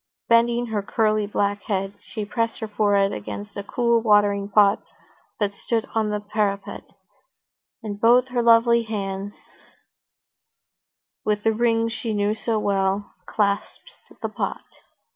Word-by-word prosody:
Bending 235 +1 +3
her 220 -3 -2
curly 215 0 0
black 205 0 -1
head, 195 -1 -1
she 215 -2 -6
pressed 230 +2 -2
her 220 - -5
forehead 205 -1 +2
against 105 -1 -7
a 200 - -3
cool 235 +2 +1
watering 205 -2 +3
pot 200 -1 +4 0.6
that 205 -2 0
stood 225 +2 -2
on 220 -1 +1
the 210 0 -1
parapet, 205 -1 -2 1.0
and 205 -1 -6
both 245 +2 +5
her 245 -1 0
lovely 235 0 +5
hands, 200 -2 -4 1.9
with 210 -1 -1
the 225 - +3
rings 230 0 +1
he 225 -2 -2
knew 205 +1 +1
so 225 0 -2
well, 200 -1 0
clasped 205 - -2 0.3
the - - -1
pot. - - -4
210 Hz, 135 wpm, -23 LUFS, 200-230 Hz, 1.9 s, both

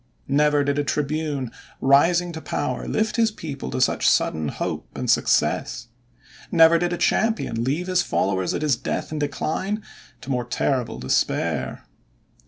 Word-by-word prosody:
Never 145 +1 +3
did 140 0 0
a - - +1
tribune 145 -3 -2 0.3
rising 170 +6 +4
to 160 -1 -7
power 145 - -3
lift 220 +1 0
his 225 -1 +4
people 155 -10 -6
to - - -3
such 130 - +3
sudden 80 -1 +1
hope - - -4
and - - -3
success. 120 -2 +1 0.6
Never 165 0 +6
did 175 0 0
a 175 - -1
champion 220 - +1
leave 145 +8 -1
his 185 -1 +2
followers 95 -1 0
at - - -2
his 145 -4 +3
death 130 - -4
and 155 - -3
decline 185 +8 -2 0.4
to 140 - -6
more 125 -2 -1
terrible 125 - -1
despair. 65 +1 -1
145 Hz, 155 wpm, -23 LUFS, 130-170 Hz, 0.6 s, Never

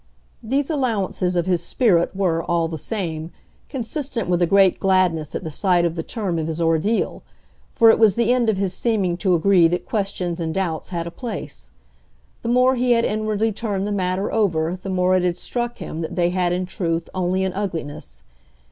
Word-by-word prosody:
These 270 +7 -1
allowances 210 - -1
of 175 - +1
his 180 -2 +1
spirit 180 -4 +2
were, 175 -4 +1
all 170 -2 0
the 160 -1 -5
same, 165 -5 -4 0.4
consistent 260 - -3
with 175 0 +1
a 175 - +4
great 195 0 +4
gladness 185 -5 +1
at - - -3
the 160 - -5
sight 175 +1 +2
of 170 - 0
the 165 - -3
term 185 -2 -3
of 160 - -2
his 160 0 -3
ordeal; 165 +7 0 0.5
for 225 -1 +6
it - - +1
was 215 -4 +5
the 235 +1 +2
end 245 -3 +2
of 210 - +1
his 190 -1 -1
seeming 200 -5 0
to 185 -1 +2
agree 175 0 +5
that 175 +2 -2
questions 190 -5 -2
and 160 -1 -3
doubts 175 -5 -2
had 170 -2 -3
a 170 - -6
place. 235 +3 -7 0.7
The 230 - -3
more 250 +2 +4
he 245 0 +3
had 230 0 +2
inwardly 215 +1 0
turned 205 -2 -3
the 210 - -2
matter 185 0 -1
over 175 -6 +1
the 185 +1 -8
more 185 0 +2
it 185 - +3
had 175 -1 0
struck 240 +4 -2
him 160 - -6
that 160 - -5
they 175 -1 +2
had 180 -1 0
in 180 +1 -1
truth 165 -2 -2
only 185 +1 0
an 190 -1 -1
ugliness. 170 -7 -5
185 Hz, 200 wpm, -22 LUFS, 170-215 Hz, 0.7 s, for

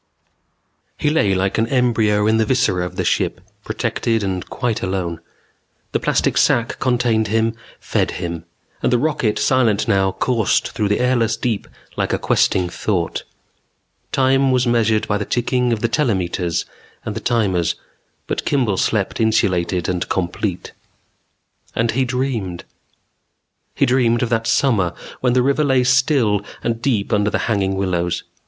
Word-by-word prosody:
_ - - -48 0.9
He 150 - +1
lay 105 -11 +2
like 95 +3 0
an 115 - +2
embryo 115 -5 +2
in 110 +1 +3
the 110 - +2
viscera 95 -8 +1
of 90 - -11
the 90 - -1
ship, - - 0 0.2
protected 115 -2 -1
and 95 -2 -2
quite 120 -3 -2
alone. 90 -3 -2 0.7
The - - 0
plastic - - +1
sac 115 0 +2
contained 120 -3 +1
him, 115 +2 +1 0.3
fed - - -1
him; 85 -2 -5 0.4
and - - +1
the 125 - +4
rocket, 130 -5 0
silent 120 -6 +2
now, 95 -1 +2
coursed 115 -5 +1
through 110 -3 -1
the 105 - +1
airless 120 -3 +1
deep 115 -4 -2 0.3
like - - 0
a - - +2
questing 90 -1 +1
thought. 90 -1 -2 0.9
Time 135 0 +3
was 125 0 +2
measured 110 -2 +2
by 105 0 0
the - - -1
ticking 125 +2 0
of 110 -2 -1
the 115 - +2
telemeters 90 - 0 0.4
and - - -4
the - - -2
timers, 100 -8 +1 0.5
but - - -3
Kimball 120 -9 +1
slept 105 +2 0
insulated 95 -6 +1
and 90 -1 -2
complete. 90 +1 -2 1.0
And 115 0 +1
he 130 +3 +1
dreamed. 120 -8 -2 1.1
He - - +3
dreamed 120 -1 +2
of 120 - -1
that 115 -1 0
summer 110 - +2 0.2
when 125 -1 +1
the 125 0 +3
river 140 +3 +2
lay 135 -3 +3
still 125 -5 +3 0.2
and 115 -1 -1
deep 115 -7 0
under 105 0 +2
the - - 0
hanging 100 -4 0
willows. 90 -3 -1
110 Hz, 155 wpm, -19 LUFS, 95-125 Hz, 1.1 s, the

